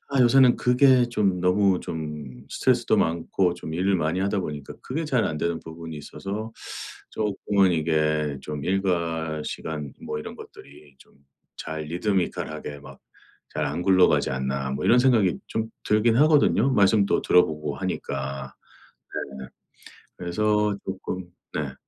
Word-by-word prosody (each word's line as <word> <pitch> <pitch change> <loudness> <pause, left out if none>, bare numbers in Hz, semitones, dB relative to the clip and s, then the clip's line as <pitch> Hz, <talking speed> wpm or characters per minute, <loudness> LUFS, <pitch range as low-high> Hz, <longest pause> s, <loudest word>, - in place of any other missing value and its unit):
아 135 - +3
요새는 125 0 +6
그게 125 0 +4
좀 100 -6 +1
너무 95 +1 +3
좀 75 -5 -6
스트레스도 - - +2
많고 85 +2 +1
좀 80 -2 -7
일을 95 +3 +1
많이 80 +2 0
하다 100 +1 0
보니까 75 -5 -6
그게 155 +6 -3
잘 130 -6 +1
안되는 80 +2 -1
부분이 80 -1 -8
있어서 105 +8 -6 0.6
쪼끔은 100 -2 +1
이게 75 -2 0
좀 75 +1 -6
일과시간 80 -5 -2
뭐 75 - -4
이런 - - -7
것들이 70 -1 -14
좀 - - -21 0.5
잘' 80 0 -5
리드미컬 90 +3 -1
하게 75 -2 -7
막 - - -13 0.5
잘 - - -1
안 90 - -3
굴러가지 95 -6 +4
않나.' 65 +1 -2
뭐 - - -3
이런 125 - +6
생각이 115 -8 +4
좀 110 0 -3 0.2
들긴 110 +2 +3
하거든요. 140 -4 +4
말씀도 100 -1 +4
들어 90 - +5
보고 75 -2 -4
하니까 70 -7 -4 0.8
네. 65 - -7 0.7
그래서 105 +3 +1
쪼끔 95 -1 -5 0.3
네 - - -3
90 Hz, 280 characters per minute, -25 LUFS, 75-105 Hz, 0.8 s, 요새는